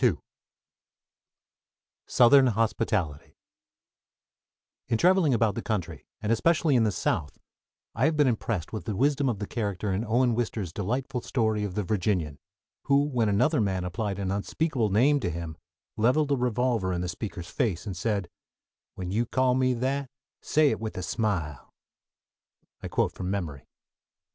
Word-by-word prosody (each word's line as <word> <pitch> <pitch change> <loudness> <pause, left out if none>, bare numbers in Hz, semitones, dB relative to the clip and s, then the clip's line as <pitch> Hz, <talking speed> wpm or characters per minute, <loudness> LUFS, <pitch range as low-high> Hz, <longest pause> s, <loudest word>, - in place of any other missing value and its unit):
II 110 -11 +4 1.9
SOUTHERN 130 +2 +6
HOSPITALITY 110 - -1 1.5
In 115 - +1
traveling 175 -3 +4
about 115 -2 +2
the 115 - -4
country, 105 -7 -4 0.2
and 105 - 0
especially 155 +4 +3
in 115 -2 +4
the 105 - +2
South, 80 -4 -2 0.6
I - - +1
have 155 -1 +1
been 150 - +5
impressed 115 -7 -1
with 110 - -5
the 105 - -2
wisdom 140 +3 +2
of 115 - -1
the 105 - -4
character 100 -3 -2
in 100 +4 -1
Owen 120 +2 +2
Wister's 105 -6 -2
delightful 125 +6 -2
story 110 -4 0
of 100 -3 -4
"The 105 - 0
Virginian," 90 -7 -1 0.5
who 140 0 +4
when 120 -6 +1
another 100 +3 +2
man 95 -3 0
applied 100 +2 -3
an 95 -1 -2
unspeakable 115 +4 -1
name 135 +9 +4
to 100 - -2
him 85 -1 -5 0.4
leveled 130 +7 +2
a - - +4
revolver 120 -5 0
in 90 -1 -1
the 90 - -2
speaker's 90 -2 -6
face, 105 -10 -1
and 100 -3 -4
said, 100 0 -1 0.7
"When 90 -1 -5
you 115 +4 0
call 130 0 +2
me 130 0 +2
that, 135 +2 -2 0.3
say 150 -2 +3
it - - -2
with 110 -3 -5
a 90 - -3
smile!" 85 - -3 1.1
(I - - -5
quote - - 0
from 90 -1 -5
memory.) 85 -9 -4
110 Hz, 160 wpm, -27 LUFS, 95-125 Hz, 1.9 s, SOUTHERN